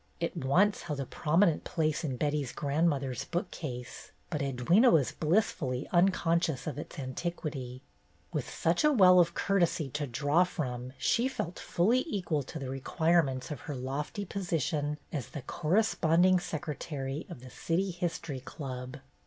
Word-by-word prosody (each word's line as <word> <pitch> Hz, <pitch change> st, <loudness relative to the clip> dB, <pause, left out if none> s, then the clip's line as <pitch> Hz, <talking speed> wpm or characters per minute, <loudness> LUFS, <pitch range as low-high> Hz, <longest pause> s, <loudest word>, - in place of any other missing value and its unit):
It -, -, -2 dB
once 185 Hz, +10 st, +2 dB
held 150 Hz, -4 st, -4 dB
a 135 Hz, -, -2 dB
prominent 165 Hz, +5 st, +2 dB
place 155 Hz, -1 st, -1 dB
in 135 Hz, -5 st, -2 dB
Betty's 145 Hz, -2 st, -1 dB
grandmother's 140 Hz, -4 st, 0 dB
bookcase, 150 Hz, -8 st, -5 dB, 0.2 s
but 150 Hz, -3 st, -1 dB
Edwyna 140 Hz, -, +4 dB
was 145 Hz, -6 st, +3 dB
blissfully 155 Hz, -, 0 dB
unconscious 170 Hz, -5 st, +2 dB
of 145 Hz, -3 st, -4 dB
its -, -, -8 dB
antiquity; 130 Hz, -2 st, -4 dB, 0.5 s
with -, -, -2 dB
such 165 Hz, -, +1 dB
a 300 Hz, -, +5 dB
well 185 Hz, -8 st, +7 dB
of 170 Hz, -1 st, +3 dB
courtesy 175 Hz, -7 st, +1 dB
to 145 Hz, +1 st, -2 dB
draw 145 Hz, +7 st, +3 dB
from 130 Hz, -8 st, -4 dB
she 230 Hz, -, +2 dB
felt 180 Hz, -9 st, -4 dB
fully 230 Hz, +9 st, +2 dB
equal 180 Hz, -, -1 dB
to 140 Hz, +4 st, -7 dB
the 135 Hz, -3 st, -5 dB
requirements 140 Hz, 0 st, +1 dB
of 145 Hz, -, -4 dB
her 145 Hz, -, -2 dB
lofty 140 Hz, -, -4 dB
position 160 Hz, -6 st, -1 dB, 0.2 s
as 140 Hz, -6 st, -3 dB
the 145 Hz, -, -7 dB
Corresponding 175 Hz, -, +3 dB
Secretary 150 Hz, -3 st, -4 dB
of 170 Hz, -9 st, -9 dB
the 130 Hz, -1 st, -11 dB
City 185 Hz, +8 st, -1 dB
History 170 Hz, -5 st, -3 dB
Club. 130 Hz, -1 st, -7 dB
155 Hz, 145 wpm, -30 LUFS, 135-175 Hz, 0.5 s, well